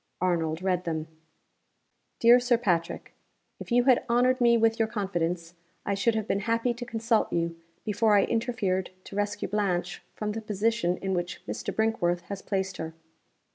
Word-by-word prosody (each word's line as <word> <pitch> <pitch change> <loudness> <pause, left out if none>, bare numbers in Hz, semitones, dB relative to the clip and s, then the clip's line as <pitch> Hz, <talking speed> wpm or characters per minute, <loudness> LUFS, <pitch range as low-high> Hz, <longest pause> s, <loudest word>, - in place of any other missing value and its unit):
Arnold 170 -2 0
read 180 -2 +1
them. 160 -2 -2 1.1
"DEAR 235 +2 +7
SIR 245 -1 +2
PATRICK, 175 -7 -1 0.5
If - - -9
you 245 +1 +4
had 255 -1 +4
honored 250 +2 +3
me 235 -1 +5
with 225 0 +2
your 225 - +3
confidence, 175 -6 -2 0.3
I 200 - 0
should 210 +3 +1
have 220 -1 -2
been 200 - +1
happy 230 +1 +1
to 245 +1 -7
consult 225 -1 +1
you 170 0 -1 0.3
before 215 0 +3
I 200 - +5
interfered 225 -6 -1
to - - -10
rescue 205 0 -1
Blanche 185 -4 -1
from 210 -1 -3
the 225 +1 -4
position 215 -3 0
in 190 0 -2
which 175 -1 -3
Mr. - - -4
Brinkworth 175 -6 0
has 195 +2 -7
placed 190 -1 -2
her. 160 0 -6
205 Hz, 170 wpm, -27 LUFS, 180-230 Hz, 1.1 s, DEAR